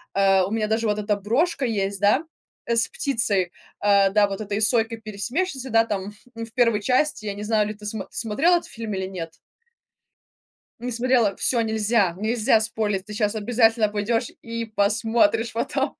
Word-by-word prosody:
э, 195 -1 +4
у 185 - -1
меня 220 0 -1
даже 220 +1 0
вот 210 0 0
эта 210 0 0
брошка 260 - 0
есть, 200 -4 -1
да, 210 +10 +3 0.4
э, 235 - +1
с 230 - +2
птицей, 225 - -1 0.3
э, 200 -1 +4
да, 205 +1 +3
вот 195 +1 -5
этой 205 0 -3
сойкой-пересмешницей, 230 - -1
да, 225 -1 +4
там 205 -2 -4 0.2
в 230 0 -7
1 230 -4 +3
части, 255 0 0
я 200 - -3
не 205 - -6
знаю, 210 -1 +1
или 215 - -4
ты 210 0 -13
смо 210 -2 -4
смотрела 275 +11 +1
этот 345 - -6
фильм 225 -2 -6
или 190 - -2
нет? 175 -4 -6 1.5
Не 245 +2 -4
смотрела, 235 -4 +2
всё 240 - +2
нельзя, 220 -4 +1
нельзя 220 +3 +2
спойлерить, 215 -3 -2
ты 210 - -10
сейчас 210 0 0
обязательно 225 0 +2
пойдешь 220 +3 -1
и 230 0 -4
посмотришь 225 +1 +1
потом. 230 +1 -2
220 Hz, 175 wpm, -23 LUFS, 205-230 Hz, 1.5 s, э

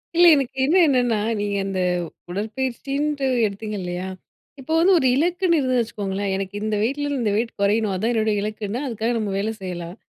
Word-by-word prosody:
இல்ல 350 +1 +6
எனக்கு 270 -2 -2
இன்னும் 345 +6 +5
என்னன்னா, 245 -5 +2 0.2
நீங்க 205 0 -1
அந்த 195 -1 -2 0.5
உடற்பயிற்சின்ட்டு 265 +8 -2 0.2
எடுத்தீங்க 210 +1 -4
இல்லையா? 180 +1 -4 0.5
இப்போ 310 +5 -4
வந்து 375 +3 +5
ஒரு 265 -5 +2
இலக்குன்னு 345 +2 +2
இருந்ததுன்னு 255 -2 +2
வச்சுக்கோங்களேன், 200 -3 -3
எனக்கு 195 0 -4
இந்த 215 0 0
வெயிட்லருந்து 285 +2 -1
இந்த 210 - +1
வெயிட் 230 +2 -1
குறையணும் 205 0 +2
அதுதான் 220 +6 0
என்னுடைய 220 -2 +1
இலக்குன்னா, 215 +3 -3
அதுக்காக 230 0 -1
நம்ம 210 -3 -2
வேலை 220 +3 -1
செய்யலாம். 175 -1 -6
225 Hz, 165 wpm, -22 LUFS, 200-270 Hz, 0.5 s, இல்ல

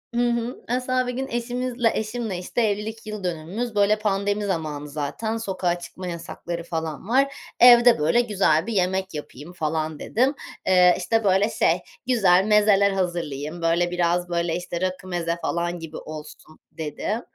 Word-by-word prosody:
Hı 240 0 +2
hı. 235 +1 -3
Mesela 255 +1 0
bir 250 - -2
gün 265 +2 -3
eşimizle 240 0 -1
eşimle, 220 -3 -3
işte, 185 +6 -2
evlilik 220 +1 -2
yıl 215 -2 -6
dönümümüz, 180 +8 -3
böyle 205 +1 +3
pandemi 205 0 0
zamanı, 155 -6 -3
zaten 155 +10 -3
sokağa 185 -5 -1
çıkma 185 +1 -8
yasakları 170 0 -5
falan 165 0 -4
var. 275 +3 +3 0.3
Evde 240 -4 +8
böyle 160 +11 +3
güzel 195 -7 +2
bir 230 - -2
yemek 190 0 0
yapayım 150 +2 -8
falan 155 -2 -2
dedim. 260 +5 +1 0.3
Eee, 180 -1 +6
işte, 225 +5 0
böyle 195 +2 +3
şey, - - +2 0.3
güzel 195 -7 +4
mezeler 210 -1 +4
hazırlayayım. 170 -4 -3
Böyle 170 +1 +2
biraz, 175 0 0
böyle, 170 -1 0
işte, 175 0 -4
rakı, 185 0 -3
meze 170 -2 -2
falan 175 0 -2
gibi 165 -1 -8
olsun 155 0 -10
dedim. 160 +8 -3
185 Hz, 155 wpm, -24 LUFS, 170-225 Hz, 0.3 s, Evde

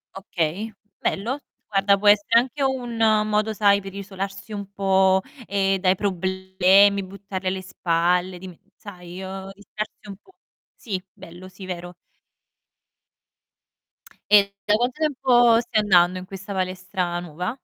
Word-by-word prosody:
Okay, 190 +3 -3 0.3
bello. 235 +8 -1 0.3
Guarda, 200 -1 +3
può 205 +1 -1
essere 205 +3 +5
anche 265 +3 -3
un 250 -3 -2 0.3
modo, 215 +1 +1
sai, 200 -1 +4
per 195 -1 -9
isolarsi 195 +1 -6
un 200 -1 -6
po', 190 -1 +3 0.2
ehm, 195 -1 +1
dai 185 0 +3
problemi, 190 +1 +2
buttarli 190 0 -7
alle 190 0 -1
spalle, 180 0 0
dime 185 -2 -10 0.2
sai, 180 -2 -10
uhm, 190 0 -7
distrarsi 210 +1 -8
un 200 - -8
po'. 380 - -25 0.4
Sì, 195 -5 -4
bello, 175 +2 -12
sì, 185 +1 -11
vero. 175 -1 -6 2.4
E 200 -1 +6
da 210 - +4
quanto 245 +2 0
tempo 250 -6 +4
stai 230 -2 0
andando 185 -2 +4
in 185 - -9
questa 195 +1 -8
palestra 185 -1 -2
nuova? 180 - -5
195 Hz, 135 wpm, -23 LUFS, 185-210 Hz, 2.4 s, E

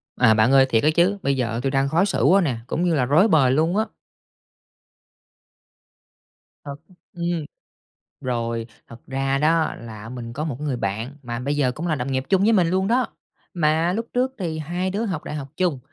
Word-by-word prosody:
À, 125 -3 +5
bạn 110 +4 +3
ơi, 135 -1 +6
thiệt 115 -4 +1
á 150 - +4
chứ, 180 +4 +3
bây 140 0 +1
giờ 115 -2 -1
tui 135 - 0
đang 135 0 +1
khó 170 +6 +3
xử 195 - -1
quá 185 +9 +5
nè, 135 -10 -1
cũng 165 - -1
như 175 -2 +2
là 130 -4 +2
rối 155 - +4
bời 150 -9 +4
luôn 160 +8 +2
á. 220 - +2 2.8
Thật 140 -1 -6 0.4
ừm. 170 -2 -2 0.8
Rồi, 115 -2 -2 0.2
thật 115 0 -12
ra 135 0 -1
đó 160 +2 +2
là 110 -2 -9
mình 120 -1 -7
có 150 +5 -3
một 150 -6 -3
cái 150 - -5
người 135 -4 -1
bạn 115 +6 -4
mà 120 -2 -5
bây 140 +4 -2
giờ 135 -4 +1
cũng 155 +7 -5
là 160 - +1
đồng 135 -1 -3
nghiệp 130 0 0
chung 190 -1 +3
với 220 +3 +4
mình 180 -6 +3
luôn 190 +1 +1
đó. 245 +1 +2 0.5
Mà 160 +1 +2
lúc 225 +4 -3
trước 255 +1 0
thì 165 -5 -3
hai 175 +4 -2
đứa 205 +4 -2
học 180 -8 -3
đại - - -6
học 140 -2 -5
chung, 175 -7 0
150 Hz, 210 wpm, -23 LUFS, 125-175 Hz, 2.8 s, ơi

